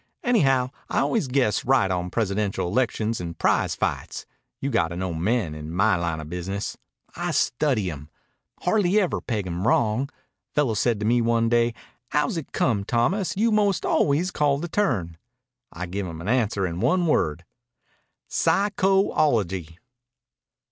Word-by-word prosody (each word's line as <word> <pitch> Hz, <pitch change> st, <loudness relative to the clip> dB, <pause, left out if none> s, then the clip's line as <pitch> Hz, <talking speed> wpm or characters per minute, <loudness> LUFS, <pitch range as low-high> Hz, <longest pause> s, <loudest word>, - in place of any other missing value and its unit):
Anyhow, 135 Hz, -, +3 dB, 0.2 s
I -, -, -2 dB
always 220 Hz, -, 0 dB
guess 125 Hz, -4 st, +1 dB
right 125 Hz, -7 st, +3 dB
on 90 Hz, -1 st, -1 dB
presidential 100 Hz, -3 st, -1 dB
elections 115 Hz, 0 st, 0 dB
and 85 Hz, -1 st, -6 dB
prize -, -, +1 dB
fights. -, -, -3 dB, 0.3 s
You 140 Hz, -, -2 dB
got 90 Hz, -9 st, +2 dB
to 85 Hz, -, -7 dB
know 90 Hz, -1 st, -3 dB
men, 90 Hz, +1 st, 0 dB
in 75 Hz, +1 st, -7 dB
my 100 Hz, +4 st, +3 dB
line 85 Hz, -2 st, -2 dB
of 75 Hz, -, -7 dB
business. 95 Hz, +4 st, -4 dB, 0.4 s
I -, -, -2 dB
study 120 Hz, -, +1 dB
'em. 75 Hz, 0 st, -10 dB, 0.5 s
Hardly 200 Hz, +1 st, +3 dB
ever 185 Hz, -4 st, 0 dB
peg 105 Hz, -5 st, -2 dB
'em 90 Hz, +3 st, -2 dB
wrong. 115 Hz, +5 st, +2 dB, 0.5 s
Fellow 145 Hz, -6 st, +2 dB
said 110 Hz, +1 st, +1 dB
to -, -, -1 dB
me 120 Hz, +2 st, +3 dB
one 115 Hz, 0 st, +2 dB
day, 120 Hz, 0 st, +2 dB, 0.3 s
'How's 150 Hz, +3 st, 0 dB
it 165 Hz, -4 st, -5 dB
come, 105 Hz, -6 st, +1 dB
Thomas, 150 Hz, -, 0 dB
you 225 Hz, +2 st, +3 dB
most 205 Hz, -5 st, +2 dB
always 160 Hz, +6 st, +2 dB
call 145 Hz, -4 st, +2 dB
the 170 Hz, +4 st, -4 dB
turn?' 105 Hz, -, -1 dB, 0.5 s
I 90 Hz, +2 st, -5 dB
give 95 Hz, +2 st, -4 dB
him 80 Hz, -2 st, -7 dB
an 85 Hz, -, -7 dB
answer 105 Hz, -5 st, +1 dB
in 85 Hz, -1 st, -4 dB
one 180 Hz, -, +2 dB
word 85 Hz, -, 0 dB, 0.8 s
psycho 195 Hz, -1 st, +2 dB
ology." 95 Hz, -, 0 dB
115 Hz, 160 wpm, -24 LUFS, 90-145 Hz, 0.8 s, Anyhow